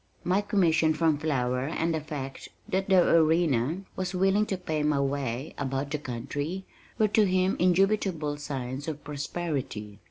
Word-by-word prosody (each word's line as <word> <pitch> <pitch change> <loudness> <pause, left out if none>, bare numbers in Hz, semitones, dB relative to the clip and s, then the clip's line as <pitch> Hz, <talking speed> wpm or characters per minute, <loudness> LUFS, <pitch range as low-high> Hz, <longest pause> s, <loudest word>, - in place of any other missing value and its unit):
My 185 +3 +2
commission 165 -6 +2
from 155 -2 +2
Flower 130 -4 0
and 165 +1 -1
the 160 - -1
fact 140 -3 -6 0.2
that 190 +1 -1
the 185 -2 +5
Arena 160 -1 +3
was 185 0 -3
willing 195 +3 +3
to 195 - -1
pay 160 -4 -2
my 150 -1 +2
way 135 0 -2
about 135 +1 -2
the 150 - -1
country, 145 +8 -4 0.3
were 215 - +4
to 210 0 +4
him 185 +1 +2
indubitable 180 -4 +2
signs 135 -1 -5
of 150 -2 -5
prosperity. 140 - -4
155 Hz, 155 wpm, -28 LUFS, 140-185 Hz, 0.3 s, the